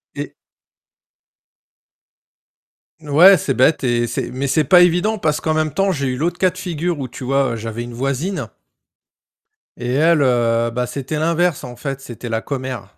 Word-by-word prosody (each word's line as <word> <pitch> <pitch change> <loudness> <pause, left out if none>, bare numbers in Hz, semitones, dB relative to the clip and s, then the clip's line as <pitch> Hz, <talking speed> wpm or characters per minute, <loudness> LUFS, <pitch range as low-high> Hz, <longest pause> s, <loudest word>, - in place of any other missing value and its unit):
Et - - -6 2.7
Ouais 160 +6 +6
c'est 135 - -2
bête 135 +4 +3
et 120 -2 +1
c'est 120 - -4
mais 130 +2 -3
c'est 150 +3 +2
pas 180 +6 +6
évident 180 +5 +2
parce 155 -5 -1
qu'en 155 -1 0
même 155 -2 -1
temps 195 +4 +1
j'ai 140 -6 -2
eu 125 -1 -2
l'autre 170 +5 -1
cas 185 0 +2
de - - -15
figure 175 -2 -3
où 135 - -4
tu 125 +2 -10
vois 135 -2 0
j'avais 115 +1 -5
une 120 0 -7
voisine 140 +10 -3 1.3
et 125 0 -3
elle, 160 +3 +3
heu, 115 -3 +2
bah 125 +1 -2
c'était 135 +4 -5
l'inverse 170 0 0
en 125 -1 -8
fait, 135 +1 -5
c'était 120 -2 -8
la 110 0 -1
commère. 130 -7 -6
140 Hz, 170 wpm, -19 LUFS, 125-165 Hz, 2.7 s, Ouais